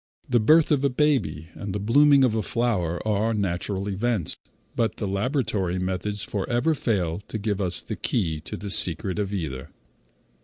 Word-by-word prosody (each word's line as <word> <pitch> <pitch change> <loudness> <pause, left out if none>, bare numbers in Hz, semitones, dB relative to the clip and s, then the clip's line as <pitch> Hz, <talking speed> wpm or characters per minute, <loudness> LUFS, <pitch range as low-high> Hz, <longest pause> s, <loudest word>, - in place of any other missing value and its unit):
The 120 -2 +3
birth 155 +9 +4
of 140 -2 +2
a 140 - +3
baby, 125 - 0
and 100 -1 -6
the - - -1
blooming 140 +6 +5
of 125 -4 +3
a 110 - 0
flower, 100 -7 -1
are 110 +2 +1
natural 95 0 -2
events, 105 -2 0 0.4
but 115 -1 0
the 105 - -3
laboratory 100 - -1
methods 95 +3 -3
forever 120 +9 0
fail 95 - -1
to - - -4
give 105 -1 -2
us 90 -2 +3
the - - -5
key 80 -9 -1
to 75 - -7
the 100 -1 -4
secret 90 +2 +3
of 100 -1 -2
either. 75 -8 -4
105 Hz, 175 wpm, -25 LUFS, 95-120 Hz, 0.4 s, blooming